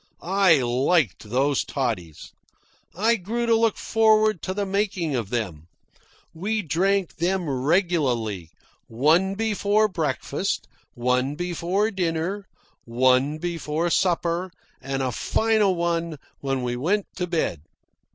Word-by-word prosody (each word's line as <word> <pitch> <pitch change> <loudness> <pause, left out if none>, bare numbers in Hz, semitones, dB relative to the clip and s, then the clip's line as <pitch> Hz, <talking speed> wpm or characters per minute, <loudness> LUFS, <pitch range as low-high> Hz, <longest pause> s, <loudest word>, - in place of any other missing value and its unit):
I 180 -6 +4
liked 125 - +1
those 135 +4 +1
toddies. 110 - -4 0.6
I 225 +5 +2
grew 225 +5 -2
to 230 - +3
look 225 -1 +2
forward 215 -3 +3
to 185 - -3
the 205 0 -1
making 190 -6 -1
of 115 -6 -2
them. 90 -10 -3 0.7
We 210 +6 -2
drank 185 +4 0
them 180 +1 0
regularly, 130 - 0 0.4
one 160 +11 +2
before 215 0 +2
breakfast, 160 -9 -2 0.3
one 125 +3 0
before 180 +5 -1
dinner, 180 +1 -2 0.4
one 130 +5 +2
before 165 0 -2
supper, 175 0 +1 0.3
and 135 0 -2
a 130 - -1
final 215 - +1
one 170 -2 -1 0.2
when 135 -2 -2
we 120 0 -2
went 185 +11 0
to 180 -1 -2
bed. 160 - -1
170 Hz, 120 wpm, -24 LUFS, 130-195 Hz, 0.7 s, I